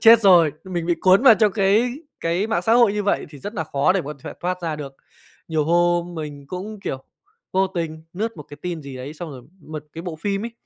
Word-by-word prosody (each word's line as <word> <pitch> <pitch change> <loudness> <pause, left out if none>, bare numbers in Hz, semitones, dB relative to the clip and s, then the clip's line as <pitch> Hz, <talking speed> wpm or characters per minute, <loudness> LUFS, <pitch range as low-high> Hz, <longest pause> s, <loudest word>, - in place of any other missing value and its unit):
chết 230 0 +8
rồi. 175 -7 +6
Mình 175 -3 -3
bị 175 - +3
cuốn 190 +5 +5
vào 245 -5 +9
trong 210 0 +3
cái 215 +4 +3 0.3
cái 175 +5 0
mạng 225 - 0
xã 225 - +2
hội 235 -4 +5
như 210 0 -1
vậy 200 - 0
thì 145 - -11
rất 205 - -7
nà 160 -5 -2
khó 140 +4 +2
để 190 - +1
có 150 +1 -5
thể - - -5
thoát 180 0 -2
ra 160 -2 -2
được. 140 -2 -7 0.5
Nhiều 155 -2 +1
hôm 175 +1 +2
mình 145 -3 -7
cũng, 195 +4 -6
kiểu, 135 -6 -5 0.5
vô 190 +1 +3
tình 165 -4 -4
lướt 220 +5 -3
một 150 - -7
cái 145 - -10
tin 175 -3 -4
gì 140 -2 -8
đấy 130 +4 -7
xong 165 0 -7
rồi 130 -3 -9 0.2
một 155 -1 -8
cái 165 - -7
bộ 170 -3 -5
phim 200 +2 -1
ấy, 235 - -4
175 Hz, 250 wpm, -22 LUFS, 155-200 Hz, 0.5 s, vào